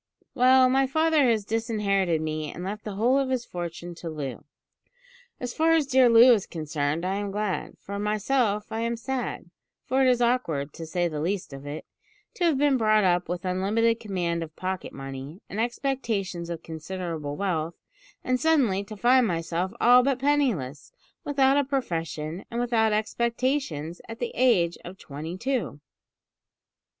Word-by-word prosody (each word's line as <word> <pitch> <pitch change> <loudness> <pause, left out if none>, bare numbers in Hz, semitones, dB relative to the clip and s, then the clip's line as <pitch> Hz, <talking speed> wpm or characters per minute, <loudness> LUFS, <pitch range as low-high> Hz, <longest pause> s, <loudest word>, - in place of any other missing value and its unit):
"Well, 255 +1 +6
my 265 +1 +3
father 315 -1 +3
has 220 -3 +1
disinherited 200 -7 0
me 155 -1 -3
and 175 - -7
left 210 +3 -5
the 210 -2 -5
whole 245 +6 +3
of 270 -1 -1
his 255 -2 -1
fortune 175 0 -6
to 170 - -6
Loo. 145 -4 -6 0.9
As 245 -1 -4
far 325 +1 +3
as 320 -3 +3
dear 260 -2 +5
Loo 235 +2 +8
is 205 -4 0
concerned 155 0 -2
I 190 +2 -1
am 205 0 -3
glad; 205 -1 -3
for 200 +1 -6
myself 210 +1 0
I 220 - -2
am 230 0 -1
sad, 245 -7 -4 0.3
for 260 +2 +1
it 265 - +5
is 250 -1 +3
awkward, 200 - 0
to 165 - -8
say 175 +1 0
the 155 -3 -4
least 180 -2 -2
of 135 +1 -9
it, 145 +2 -6 0.5
to 355 - -1
have 320 -5 +3
been 285 -1 +3
brought 215 -2 +3
up 180 -2 +2
with 175 +1 -3
unlimited 215 +5 +1
command 175 -5 -2
of 160 -2 -7
pocket 185 0 -4
money, 135 +4 -8
and 215 - -3
expectations 225 -8 -2
of 165 -1 -5
considerable 160 -2 -5
wealth, 170 -3 -2 0.5
and 255 0 0
suddenly 260 -12 +2
to 215 +1 -9
find 245 +2 +4
myself 170 +1 -2
all 245 +1 +7
but 270 0 +1
penniless, 245 - 0 0.3
without 275 -1 +3
a 285 - +3
profession 165 - -3
and 235 - -3
without 230 -2 +2
expectations, 220 - -1
at 225 - -6
the 240 0 -3
age 205 -10 +2
of 180 +2 -9
twenty 155 +4 -7
two." 250 - -2
205 Hz, 170 wpm, -26 LUFS, 170-250 Hz, 0.9 s, Loo